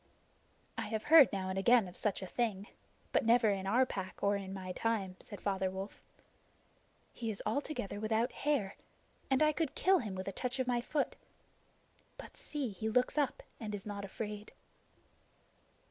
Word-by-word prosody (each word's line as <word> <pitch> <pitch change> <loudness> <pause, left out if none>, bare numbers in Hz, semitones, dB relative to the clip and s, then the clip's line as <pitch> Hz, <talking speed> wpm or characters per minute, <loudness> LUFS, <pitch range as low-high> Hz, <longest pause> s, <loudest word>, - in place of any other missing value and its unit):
"I - - -2
have 220 0 -2
heard 310 -4 +8
now 190 -2 -2
and 190 +1 -1
again 235 0 +5
of 180 - -11
such 200 -2 -1
a - - -3
thing, 205 -1 -1 0.5
but - - +3
never 230 -1 +5
in 195 -1 -2
our 250 +6 +4
Pack 190 -6 -6
or 200 0 +3
in 195 -1 -4
my 190 -1 -5
time," 200 -3 -1
said 205 - -9
Father 190 -2 0
Wolf. 190 +2 -6 1.1
"He 230 -2 -4
is 210 - -3
altogether 285 -8 -2
without 220 +3 +1
hair, 275 -10 -1 0.5
and 265 +2 +4
I 305 - +5
could 310 -2 -2
kill 380 0 +4
him 210 -6 -4
with 185 +1 -5
a - - -1
touch 250 +5 -2
of 260 - 0
my 245 -1 +1
foot. 290 +4 -1 1.0
But - - -10
see, 290 -5 -3
he 215 +3 -3
looks 250 +3 +2
up 290 -3 0 0.2
and 210 -2 -4
is 195 - -8
not 205 -1 -5
afraid." 210 +1 -6
215 Hz, 175 wpm, -34 LUFS, 195-250 Hz, 1.1 s, heard